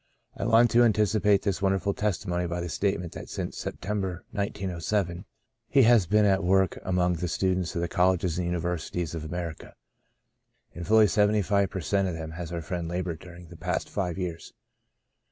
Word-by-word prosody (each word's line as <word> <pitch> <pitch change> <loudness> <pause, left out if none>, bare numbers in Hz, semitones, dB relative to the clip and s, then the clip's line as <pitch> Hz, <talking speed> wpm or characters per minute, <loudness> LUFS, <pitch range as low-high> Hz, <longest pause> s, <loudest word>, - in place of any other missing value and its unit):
I - - -3
want 115 0 +5
to 120 - +5
anticipate 105 -2 +3
this 100 -3 -1
wonderful 95 0 +1
testimony 90 -4 -1
by 85 +1 -3
the 85 0 -4
statement 90 -3 -1
that - - -8
since - - -4
September, 95 -4 -4
1907, 95 -2 -2 0.4
he 135 -1 +5
has 115 -6 +5
been 105 +2 +4
at 95 -1 +3
work 95 +1 +2
among 90 -1 +1
the 90 - -2
students 90 0 -1
of 85 - -1
the 85 - 0
colleges 90 -2 +1
and 90 - -1
universities 85 -1 -2
of 80 -2 -4
America. 85 0 -6 1.0
In 85 - -7
fully 110 +2 +6
seventy 105 +1 +3
five 100 0 +2
per 95 - -4
cent, 100 +4 +1
of 90 - -3
them 80 -1 -6
has 85 0 -6
our 85 -1 -4
friend 85 +1 -4
laboured 85 -1 -3
during 85 -1 -12
the 85 - -11
past 90 +3 -3
five 90 -4 -2
years. 85 -3 -5
90 Hz, 180 wpm, -27 LUFS, 85-100 Hz, 1.0 s, fully